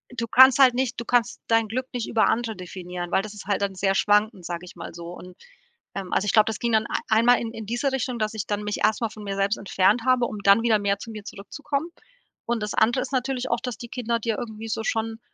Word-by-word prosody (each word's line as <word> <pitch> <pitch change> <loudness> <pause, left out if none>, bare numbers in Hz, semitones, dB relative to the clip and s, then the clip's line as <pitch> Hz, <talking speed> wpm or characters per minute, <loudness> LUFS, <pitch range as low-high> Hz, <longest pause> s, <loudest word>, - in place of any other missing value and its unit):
du 230 -1 -3
kannst 260 +3 +7
halt 260 -2 +7
nicht 255 -1 -1
du 235 - -5
kannst 240 -1 +1
dein 225 -1 +3
Glück 255 +4 -3
nicht 245 -2 -3
über 225 - +2
Andere 230 -1 -1
definieren, 180 -1 -7
weil - - +3
das 210 +1 -8
ist 210 - -10
halt 200 0 -1
dann 200 -1 -1
sehr 195 +1 +1
schwankend, 210 -2 +2
sage 175 0 -5
ich 180 - -13
mal - - -8
so. 170 0 -9
Und, 180 +1 -10 0.6
ähm, 190 -2 -5
also 195 - +1
ich 210 - +1
glaub, 215 -1 +6
das 220 - -3
ging 235 - -1
dann 220 -1 +3
ei - - -1
1 220 +1 +3
Mal 245 0 +6
in 230 - -4
in 225 - -7
diese 240 +6 -1
Richtung, 255 -2 -2
dass 215 0 -1
ich 220 -2 -4
dann 205 0 -2
mich 210 0 -3
erst 215 - +2
mal 230 - 0
von 215 0 -11
mir 200 -1 -4
selbst 200 +2 +1
entfernt 200 +3 +2
habe, 255 -1 +3
um 215 -3 -5
dann 200 +3 +6
wieder 225 -3 +3
mehr 200 0 0
zu 230 - -8
mir 215 -2 -8
zurückzukommen. 280 - -5 0.6
Und 235 -2 -1
das 210 - -3
andere 235 +4 +2
ist - - -5
natürlich 255 0 -1
auch, 235 - +1
dass 250 -3 -5
die 235 - -9
Kinder 235 -1 -2
dir 225 -1 -2
irgendwie 225 -1 -7
so 220 0 -2
schon 225 0 -2
220 Hz, 270 wpm, -24 LUFS, 200-240 Hz, 0.6 s, kannst